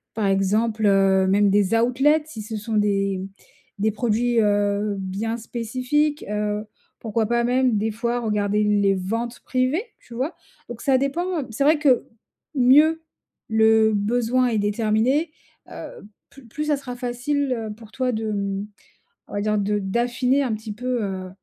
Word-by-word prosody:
par 215 -2 -1
exemple, 210 +3 +1
heu, 195 -1 +4
même 200 +1 +3
des 200 0 +2
outlets 265 +7 +3
si 275 -9 -8
ce 215 +1 -5
sont 215 +1 -4
des 195 -2 +1 0.6
des 215 +2 +2
produits, 230 +2 +1
heu, 205 0 +1
bien 200 +5 -3
spécifiques. 255 +6 -1
Heu, 210 0 -2 0.3
pourquoi 220 -1 -1
pas 235 +1 +1
même 250 -1 +2
des 220 +2 -1
fois 235 +2 -2
regarder 210 -2 0
les 205 -1 +2
ventes 230 +6 -3
privées, 255 +9 0 0.2
tu 235 - -13
vois? 265 +8 -2 0.3
Donc 235 -1 -8
ça 270 -2 +3
dépend, 330 +6 -1
heu, - - -11
c'est 225 +5 -1
vrai 305 +2 +5
que 270 -5 +3 0.5
mieux 300 +5 +5 0.5
le 220 0 +4
besoin 240 +4 +1
est 225 - 0
déterminé, 220 +9 +1 0.4
heu, - - -7 0.4
plus 275 -4 -16
plus 300 +7 -4
ça 300 -1 +2
sera 260 -3 -7
facile, 255 +3 -1
heu, 225 -3 -4
pour 220 -1 -15
toi 255 +1 -1
de, 220 -1 -2
mmh, 200 0 -3 0.6
on - - -12
va 205 - -1
dire 210 0 0
de 205 +1 0
d'affiner 245 +6 0
un 250 -4 -1
petit 215 0 -7
peu, 245 +1 -2
heu, 190 -2 -4
225 Hz, 165 wpm, -23 LUFS, 205-255 Hz, 0.6 s, vrai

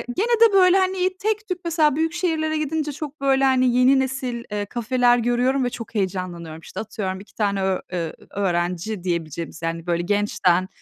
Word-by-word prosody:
gene 465 +3 +1
de - - -7
böyle, 370 -1 +6
hani, 375 0 0
tek 430 0 -1
tük 365 -1 -3
mesela 315 -4 +2
büyük 325 +1 0
şehirlere 320 -3 0
gidince 305 0 -2
çok 295 0 -7
böyle, 270 0 +3
hani, 255 -2 +3
yeni 265 +2 +5
nesil, 260 -3 -2
eee, 205 0 -2
kafeler 245 +2 +2
görüyorum 245 +3 +1
ve 245 - 0
çok 230 -1 -9
heyecanlanıyorum. 180 -4 -3
İşte, - - -8
atıyorum, 195 -3 -4
2 205 - -16
tane 200 -2 0
ö 190 -1 +1
eee, 165 -3 -2 0.2
öğrenci 180 +1 -1
diyebileceğimiz, 165 -2 -4
yani, 165 +1 -4
böyle 170 0 0
gençten, 185 -2 +1
245 Hz, 180 wpm, -22 LUFS, 185-305 Hz, 0.2 s, böyle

